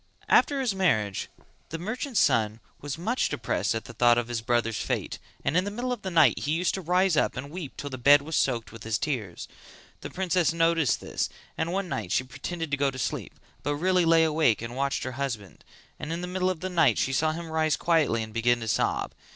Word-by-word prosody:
After 285 -1 +4
his 245 -6 0
marriage 110 - 0 0.4
the 165 - -4
merchant's 220 - -2
son 115 -8 +2 0.2
was 145 0 -5
much 225 +10 0
depressed 105 -1 -1
at 115 - -4
the 115 - -10
thought 120 +1 +4
of 120 0 -1
his 120 -2 -2
brothers' 115 -2 0
fate - - -3 0.3
and - - +1
in 180 - +4
the 205 - -3
middle 245 +4 -2
of 240 - -7
the 190 - -4
night 170 -3 +4
he 150 - -1
used 175 +2 +1
to 190 - -3
rise 180 +1 +2
up - - +1
and 140 +2 -6
weep 165 -5 -7
till 145 - -6
the 130 - -6
bed 140 +3 +6
was 160 +2 -4
soaked 120 -4 0
with 115 - -11
his 110 -1 -1
tears; 110 - -4 0.5
the - - -7
princess 180 -3 +1
noticed 165 -5 +2
this - - -2 0.3
and 160 +1 -2
one 195 +1 -1
night 90 - -4
she 125 - +2
pretended 165 +4 -6
to 140 - +1
go 140 0 +2
to 135 - -8
sleep 110 -5 -3 0.3
but 145 - -1
really 180 +3 +2
lay 165 0 +5
awake 155 -7 +2
and 115 +1 -6
watched 140 +1 -1
her 130 - -3
husband; 110 - -5 0.4
and 155 - -5
in 170 +1 -3
the 180 - -4
middle 185 0 0
of 180 -4 -3
the 185 - -3
night 160 -10 +3
saw 145 +4 +1
him 165 0 -6
rise 160 -1 +2
quietly 155 -9 +2
and 110 0 -9
begin 120 +1 +2
to 115 - -6
sob. - - 0
150 Hz, 230 wpm, -27 LUFS, 120-175 Hz, 0.5 s, bed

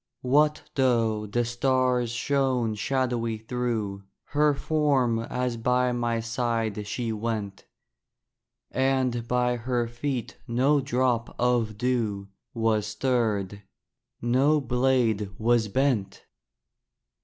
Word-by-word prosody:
What 150 +4 +3
though 115 -5 +1
the 120 +4 0
stars 125 0 +1
shone 125 -2 0
shadowy 120 -1 -1
through 110 -3 -3 0.3
Her 150 0 +3
form 140 -6 +1
as 125 +1 -2
by 125 +2 +2
my 120 -1 -1
side 115 -3 -2
she 115 +1 -2
went, 105 -2 -4 1.0
And 130 -3 0
by 125 0 +1
her 120 0 -1
feet 120 +1 -4
no 135 +5 +2
drop 125 -3 0
of 120 -3 +1
dew 110 -5 -1 0.3
Was 110 -2 +1
stirred, 105 -6 -1 0.6
no 135 +6 +3
blade 125 -5 +1
was 115 0 +2
bent! 125 -3 0
120 Hz, 100 wpm, -26 LUFS, 115-130 Hz, 1.0 s, What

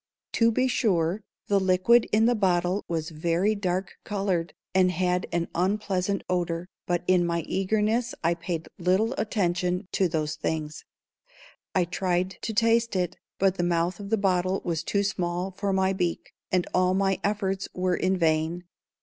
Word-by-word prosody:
To 230 0 +3
be 255 +3 +2
sure, 190 -6 +1 0.2
the 200 -1 +2
liquid 190 +5 +4
in 220 +1 +4
the 240 - +4
bottle 185 -2 +1
was 160 -1 -3
very 170 +6 +1
dark 185 -2 -2
colored, 185 -6 -1 0.2
and 185 0 +4
had 180 +1 0
an 170 0 0
unpleasant 195 +1 0
odor, 175 -1 -1 0.2
but 175 -1 0
in 180 -1 +4
my 170 -1 0
eagerness 215 +7 0
I 170 +1 +3
paid 170 -1 -4
little 190 +7 +2
attention 180 -3 0
to 190 - +2
those 155 -2 -2
things. 155 -1 -3 0.9
I 185 -2 +3
tried 180 +1 -1
to 225 - -3
taste 230 0 +2
it, 180 -1 -1 0.2
but 195 0 +2
the 175 - 0
mouth 175 +1 0
of 200 -1 -7
the 225 - +2
bottle 185 -1 +1
was 165 -2 -1
too 200 +4 0
small 180 -1 -2
for 195 +2 -2
my 190 0 +2
beak, 175 -3 -2 0.2
and 180 -1 +2
all 185 0 +3
my 195 0 +1
efforts 195 -2 -1
were 180 -1 0
in 185 +2 +1
vain. 160 +1 +1
185 Hz, 165 wpm, -26 LUFS, 175-200 Hz, 0.9 s, liquid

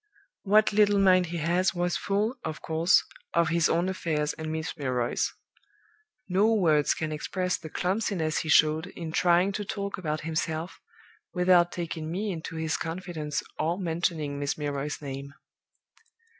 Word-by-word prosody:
"What 215 +1 +4
little 205 -1 +4
mind 185 -2 +5
he 170 +1 -4
has 175 +3 +1
was 175 0 0
full, 205 +4 0
of 155 -1 -4
course, 165 +3 +3 0.3
of 170 -2 +3
his 170 -1 +2
own 170 +2 +1
affairs 155 -5 -1
and 155 0 -5
Miss 160 +1 -3
Milroy's. 125 -5 -1 1.0
No 195 +4 +3
words 155 -7 +3
can 160 -1 -3
express 180 +4 -2
the 160 - -8
clumsiness 180 -3 -1
he 160 - -4
showed 155 +2 +4
in 165 -3 -7
trying 175 +3 +3
to 205 +1 -3
talk 200 -1 -4
about 155 -3 -2
himself, 160 +1 -3 0.6
without 180 -1 +4
taking 160 -2 -4
me 200 +5 -2
into 165 -1 -6
his 160 -1 -1
confidence 165 -3 -4 0.2
or 165 +3 0
mentioning 165 -5 -2
Miss 145 0 -2
Milroy's 145 0 -3
name. 140 0 -6
170 Hz, 150 wpm, -27 LUFS, 155-185 Hz, 1.0 s, mind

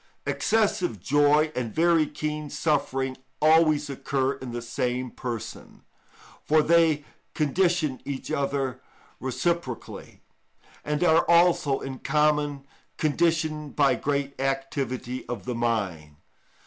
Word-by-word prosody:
Excessive 200 - 0
joy 145 - +3
and 120 -3 -3
very 165 -1 +3
keen 150 0 -4
suffering 140 -3 -1 0.2
always 155 -1 +4
occur 135 -1 -1
in 130 -2 -8
the 120 - -4
same 125 +1 -2
person, 120 -4 -7 0.6
for 155 0 +3
they 160 -3 +3 0.3
condition 160 -2 +1
each 140 -2 -5
other 135 -2 -1 0.4
reciprocally, 130 0 -3 0.6
and 150 +2 -1
are 165 -2 +5
also 170 -5 +4
in 130 -1 -6
common 150 -1 +1 0.3
conditioned 155 -1 0
by 140 -2 +4
great 140 -1 -2
activity 135 -2 -2
of 115 -7 -5
the 125 - -2
mind. 100 -11 -2
145 Hz, 110 wpm, -26 LUFS, 130-155 Hz, 0.6 s, are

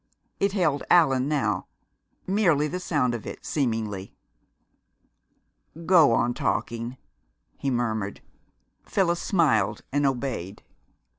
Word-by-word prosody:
It 200 0 +1
held 155 -8 +1
Allan 135 -7 +4
now; 110 -11 -1 0.6
merely 175 -7 +2
the 180 +4 -4
sound 145 -9 0
of 115 - -6
it, - - -8
seemingly. 110 -8 -2 1.7
"Go 165 -8 +6
on 120 +1 +2
talking," 120 +1 -2 0.6
he 140 - -1
murmured. 110 -5 -2 0.6
Phyllis 175 -3 0
smiled 115 - +1
and 145 +1 +2
obeyed. 120 -8 -3
135 Hz, 100 wpm, -25 LUFS, 115-165 Hz, 1.7 s, Go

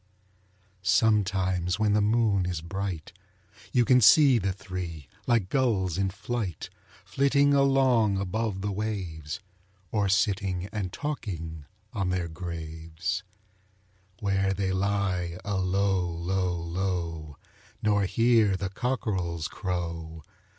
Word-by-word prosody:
Sometimes 95 -3 +2
when 105 -1 +2
the 105 - +3
moon 105 -3 +2
is 90 -4 -3
bright 90 -2 -4 0.6
You 120 -1 +3
can 125 +1 +5
see 130 +3 +7
the 100 -1 0
three, 90 -6 -6 0.2
like 115 -6 +2
gulls 105 - +1
in 95 -1 +1
flight, 105 -3 -4 0.3
Flitting 140 +7 +3
along 130 -7 +4
above 100 +1 -2
the 100 +1 -2
waves, 95 -5 -4 0.5
Or 105 -3 +1
sitting 95 -2 +1
and 100 -4 -3
talking 85 - -5 0.3
on 100 -5 -1
their 90 -2 -1
graves, 80 +1 -4 1.0
Where 95 -1 +1
they 95 0 -1
lie 95 -3 0
alow, 95 -1 +1
low, 90 +2 -1
low, 85 -3 -3 0.5
Nor 105 -2 +3
hear 115 -2 +3
the 95 -1 -3
cockrel's 95 -9 -2
crow. 85 -3 -4
95 Hz, 110 wpm, -27 LUFS, 90-105 Hz, 1.0 s, see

